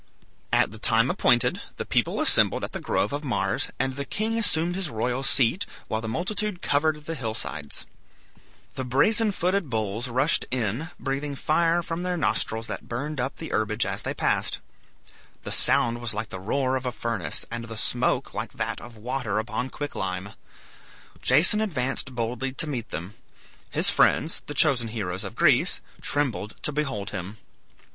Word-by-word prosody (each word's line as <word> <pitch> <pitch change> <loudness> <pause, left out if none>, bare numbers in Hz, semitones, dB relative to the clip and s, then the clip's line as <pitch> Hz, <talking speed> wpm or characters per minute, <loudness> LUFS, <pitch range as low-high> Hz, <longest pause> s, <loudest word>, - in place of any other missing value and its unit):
At - - +3
the 110 - -8
time 115 +4 +3
appointed, 120 -2 +3 0.2
the - - -3
people - - +1
assembled - - +4
at - - -3
the - - -4
grove 105 - 0
of 145 +1 -2
Mars, 130 -5 0
and 130 - 0
the 140 - -3
king 215 +10 -1
assumed 175 -6 +2
his 190 -4 -2
royal 120 +3 -1
seat, 135 - +2 0.2
while 110 - -1
the 110 - -5
multitude 190 - -2
covered 150 +1 +1
the 165 - -3
hill 115 -7 -3
sides. 75 -9 -5 0.9
The 130 - -3
brazen 210 - +4
footed 185 -3 0
bulls 110 +1 -2
rushed 130 +6 +2
in, 125 - -1
breathing 140 +1 -2
fire 165 +4 +2
from 165 +1 -4
their 180 0 -1
nostrils 115 -7 0
that - - -5
burned 145 +5 -3
up 135 +2 -2
the 160 - -6
herbage 110 +1 +1
as - - -3
they - - -3
passed. - - +1 0.9
The - - -4
sound 120 0 +4
was 115 -3 -2
like 105 0 -3
the 95 - -6
roar 130 +7 0
of 130 -1 -2
a - - 0
furnace, 115 -1 -1
and 115 0 -4
the 115 -1 -7
smoke 125 +3 +2
like - - -4
that - - -3
of 120 0 -11
water 115 -2 -2
upon 120 +3 -2
quick 145 +1 -5
lime. - - -3 0.9
Jason 170 +11 +5
advanced 135 -8 -1
boldly 120 +3 -2
to 150 - 0
meet 125 -7 -4
them. 90 +6 -6 0.6
His - - +4
friends, 160 - +3
the 145 - -5
chosen 135 -7 +4
heroes 100 -5 -3
of - - -6
Greece, - - +4 0.2
trembled 130 -7 -1
to - - 0
behold 135 -9 -2
him. 95 +4 -6
130 Hz, 175 wpm, -26 LUFS, 115-155 Hz, 0.9 s, Jason